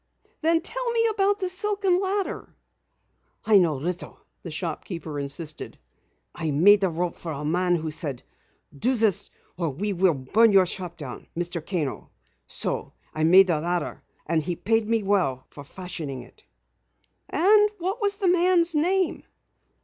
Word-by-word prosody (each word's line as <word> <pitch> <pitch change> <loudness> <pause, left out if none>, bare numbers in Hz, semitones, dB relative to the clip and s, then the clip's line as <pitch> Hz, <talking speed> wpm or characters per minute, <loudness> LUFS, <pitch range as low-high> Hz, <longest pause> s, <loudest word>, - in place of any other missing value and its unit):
"Then 330 +1 +2
tell - - -3
me 460 -1 +1
about 405 -1 +1
the 375 - -1
silken 380 0 +1
ladder." 395 0 -3 0.9
"I 215 -2 +6
know 165 -5 +2
little," 170 +6 -4 0.2
the 170 - -8
shopkeeper 160 -1 -5
insisted. 150 +3 -5 0.6
"I 160 -2 -3
made 195 +8 +5
the 190 - +2
rope 175 +1 -2
for 165 - -7
a 150 0 -5
man 175 +3 +1
who 160 -2 -3
said: 150 -5 -4 0.5
'Do 250 - +1
this 220 -5 +2 0.3
or 170 -3 -1
we 200 +9 -3
will 180 -3 +2
burn 205 - +3
your 190 -1 +6
shop 180 -1 -3
down, 130 -6 -8
Mr. 175 -1 -2
Kano.' 160 -7 -3 0.4
So - - 0 0.2
I 155 - -2
made 185 +4 +7
the 165 -5 0
ladder 175 +1 -2 0.2
and 160 0 +1
he 175 +3 -3
paid 225 +4 0
me 225 -1 +1
well 180 -11 0
for 145 - -11
fashioning 155 -5 -7
it." - - -20 0.8
"And 415 +5 +4
what 380 +6 -3
was 405 -1 +1
the 395 -2 -1
man's 350 -1 +3
name?" 360 +4 +1
185 Hz, 155 wpm, -25 LUFS, -, 0.9 s, made